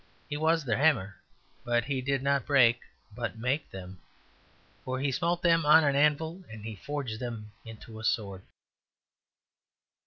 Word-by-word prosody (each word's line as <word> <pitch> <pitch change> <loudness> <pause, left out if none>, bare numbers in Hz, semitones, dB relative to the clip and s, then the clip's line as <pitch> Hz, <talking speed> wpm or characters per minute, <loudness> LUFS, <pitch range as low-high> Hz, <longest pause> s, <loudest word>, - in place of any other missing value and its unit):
He 145 - -4
was 160 0 +1
their 115 -3 +1
hammer, 105 - +2 0.5
but 120 -1 +1
he 135 -1 -2
did 135 0 -1
not 140 0 +1
break 125 -4 +5 0.3
but - - -4
make 135 +6 -1
them; 95 -1 -10 0.8
for 130 0 -3
he 140 0 0
smote 170 +5 -1
them 165 -1 +4
on 155 +2 +7
an 140 -2 +2
anvil 155 +5 +1
and 110 -2 -10
he 110 -1 -5
forged 140 -2 -5
them 115 -4 -6
into 110 0 -10
a - - -9
sword. 100 -4 -1
130 Hz, 155 wpm, -29 LUFS, 115-150 Hz, 0.8 s, on